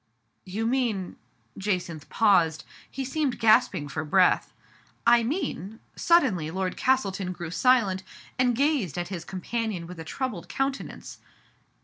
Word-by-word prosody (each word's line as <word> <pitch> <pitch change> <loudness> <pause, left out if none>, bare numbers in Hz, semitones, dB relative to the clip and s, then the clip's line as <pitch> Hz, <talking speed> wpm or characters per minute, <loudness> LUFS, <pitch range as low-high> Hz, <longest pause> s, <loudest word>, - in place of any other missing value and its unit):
" - - -47
You 225 +1 0
mean 230 -7 -1 0.2
" 115 0 -29
Jacynth 175 -6 -2
paused; 175 -8 +3 0.3
he 270 0 -4
seemed 280 -1 -1
gasping 220 -9 +3
for 155 +3 -4
breath. 180 +4 +3 0.3
" - - -34
I 235 0 +6
mean 230 - -3
" - - -38
suddenly 260 - +3
Lord 185 +2 -2
Castleton 195 -8 0
grew 170 -2 -7
silent, 205 -4 +3 0.4
and 250 -2 +3
gazed 275 - +1
at 175 0 -3
his 180 -4 -5
companion 190 0 -3
with 175 0 -10
a - - -5
troubled 195 -3 -4
countenance. 270 0 -4
200 Hz, 145 wpm, -26 LUFS, 175-255 Hz, 0.4 s, I